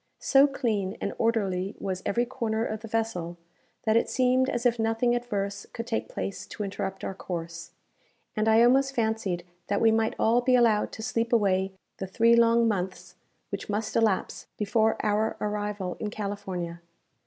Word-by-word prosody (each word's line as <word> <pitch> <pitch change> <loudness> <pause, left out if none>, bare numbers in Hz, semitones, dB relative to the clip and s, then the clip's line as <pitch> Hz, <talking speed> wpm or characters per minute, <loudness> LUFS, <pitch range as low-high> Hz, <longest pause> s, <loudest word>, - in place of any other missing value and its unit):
So 275 +1 +5
clean 220 -9 -1
and - - -3
orderly 200 -4 0
was 190 -1 -3
every 240 +4 +1
corner 230 -3 -2
of 215 -2 -3
the 225 - -9
vessel, 210 -7 -2 0.5
that 220 0 +2
it 230 - +3
seemed 255 +1 +2
as 240 -2 -2
if 240 -1 +3
nothing 225 +2 +2
adverse 200 -5 -3
could 230 - -5
take 225 -1 -2
place 195 - -5
to 210 - -5
interrupt 195 -1 -4
our - - -3
course; 170 -2 -6 0.7
and 215 +1 0
I 220 +1 +6
almost 270 +3 +4
fancied 220 -6 -1 0.2
that 200 - +1
we 225 - +5
might 220 0 +1
all 235 +2 +3
be 255 +1 +3
allowed 230 -4 +3
to 220 - -7
sleep 230 -1 -1
away 195 -4 +2 0.2
the 190 - -4
three 230 +5 +4
long 235 0 +4
months 190 -3 -3 0.4
which - - -5
must 210 +1 -2
elapse 220 -4 +1
before 220 +1 +2
our 215 +1 +1
arrival 205 -3 -3
in 215 - -2
California. 195 -5 -5
220 Hz, 170 wpm, -27 LUFS, 195-235 Hz, 0.7 s, I